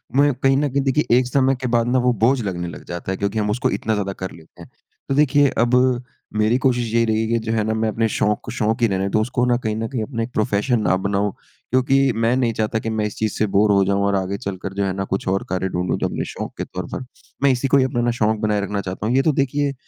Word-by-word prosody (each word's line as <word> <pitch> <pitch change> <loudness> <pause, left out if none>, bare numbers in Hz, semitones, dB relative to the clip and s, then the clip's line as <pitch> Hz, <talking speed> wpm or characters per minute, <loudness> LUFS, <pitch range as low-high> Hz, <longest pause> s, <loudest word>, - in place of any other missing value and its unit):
मैं 145 0 +4
कहीं 135 +1 +2
न 145 0 +1
कहीं 140 +2 0
देखिए 135 -2 +2
एक 125 -1 +2
समय 135 +1 +2
के 130 - -1
बाद 120 0 +1
ना 130 +1 +2
वह 125 0 +3
बोझ 125 +3 +3
लगने 90 -3 -3
लग - - -9
जाता 85 +2 -5
है। 95 - -2
क्योंकि 100 +2 -1
हम 105 0 0
उसको 120 +4 0
इतना 110 - -1
ज़्यादा 100 -2 -2
कर 95 -1 -6
लेतें 80 -1 -15
हैं। - - -15 0.4
तो 135 - +1
देखिए 145 -1 +4
अब 120 +2 +3 0.6
मेरी 110 +3 +3
कोशिश 120 -3 0
यही 115 0 +3
रही 110 0 +1
है 110 - -1
कि 115 +1 +1
जो 110 - -1
है 110 -2 +1
ना 110 +1 -1
मैं 110 0 0
अपने 115 +1 0
शौक़ 105 0 0
को 115 - -6
शौक़ 115 0 -1
ही 115 - +5
रहने 95 -1 -1
दूँ 110 - +2
उसको 120 +2 0
न - - +2
कहीं 110 -1 -1
न 110 +1 -2
कहीं 125 -5 -3
अपना 115 -2 -3
एक 125 - -6
प्रोफ़ेशन 110 +3 +1
ना 95 -2 +2
बनाऊँ। 100 +1 0 0.4
क्योंकि 135 +1 +3
मैं 115 +2 +2
नहीं 120 -3 +1
चाहता 110 +1 -1
कि 115 - -4
मैं 110 -1 -1
इस 105 - -4
चीज़ 110 -1 -1
से 110 - +2
बोर 105 +1 +4
हो 100 -1 +4
जाऊँ 100 +1 +1
और 100 0 +1
आगे 95 +1 -1
चलकर 95 -1 -5
जो 100 0 -1
है 95 - 0
ना 95 - -2
कुछ 95 0 -3
और 95 +1 0
कार्य 95 +1 -1
ढूँढूँ। 90 0 -1
जो - - 0
अपने - - -3
शौक़ - - -6
के - - -2
तौर - - -6
पर 130 - -4 0.4
मैं 140 - +5
इसी 130 +2 0
को 140 - +4
ही 130 - +4
अपना 120 -2 0
शौक़ 110 -1 +1
बनाए 105 -2 0
रखना 100 0 -2
चाहता 95 +2 -5
हूँ। 125 - +1
ये 135 - +5
तो 155 - +3
देखिए 140 +1 0
110 Hz, 285 wpm, -21 LUFS, 100-125 Hz, 0.6 s, ही